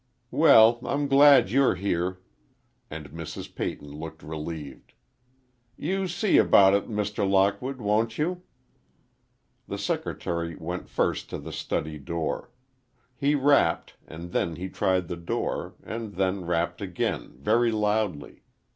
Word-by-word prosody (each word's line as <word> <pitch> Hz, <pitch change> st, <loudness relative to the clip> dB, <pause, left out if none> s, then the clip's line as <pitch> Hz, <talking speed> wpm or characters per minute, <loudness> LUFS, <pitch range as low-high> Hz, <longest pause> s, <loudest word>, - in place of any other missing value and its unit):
"Well, 120 Hz, -7 st, +6 dB
I'm 145 Hz, +1 st, -1 dB
glad 140 Hz, -6 st, +6 dB
you're 135 Hz, -4 st, +3 dB
here." 90 Hz, -1 st, -2 dB, 0.7 s
And 75 Hz, -3 st, -8 dB
Mrs. 80 Hz, 0 st, -8 dB
Peyton 75 Hz, -, -5 dB
looked 80 Hz, 0 st, -8 dB
relieved. 75 Hz, -3 st, -7 dB, 0.8 s
"You 190 Hz, +5 st, -1 dB
see 180 Hz, +3 st, +2 dB
about 95 Hz, -1 st, +6 dB
it, 100 Hz, +3 st, 0 dB
Mr. 105 Hz, -2 st, -1 dB
Lockwood, 100 Hz, +8 st, +1 dB
won't 110 Hz, +1 st, 0 dB
you?" 175 Hz, +4 st, -1 dB, 1.3 s
The -, -, -4 dB
secretary 85 Hz, -1 st, -3 dB
went 90 Hz, +3 st, -6 dB
first -, -, -1 dB
to -, -, -4 dB
the -, -, -8 dB
study 75 Hz, 0 st, -3 dB
door. 80 Hz, +3 st, -3 dB, 0.7 s
He 140 Hz, +3 st, +1 dB
rapped, 140 Hz, -, +2 dB
and 85 Hz, +2 st, -9 dB
then 85 Hz, -3 st, -1 dB
he 95 Hz, +3 st, -5 dB
tried 90 Hz, -1 st, 0 dB
the 85 Hz, -, -5 dB
door, 85 Hz, -, -3 dB
and 110 Hz, -2 st, -6 dB
then 95 Hz, 0 st, -1 dB
rapped 85 Hz, +1 st, -1 dB
again, 90 Hz, -3 st, -3 dB
very 115 Hz, -, +2 dB
loudly. 105 Hz, -8 st, -1 dB
95 Hz, 130 wpm, -26 LUFS, 85-120 Hz, 1.3 s, Well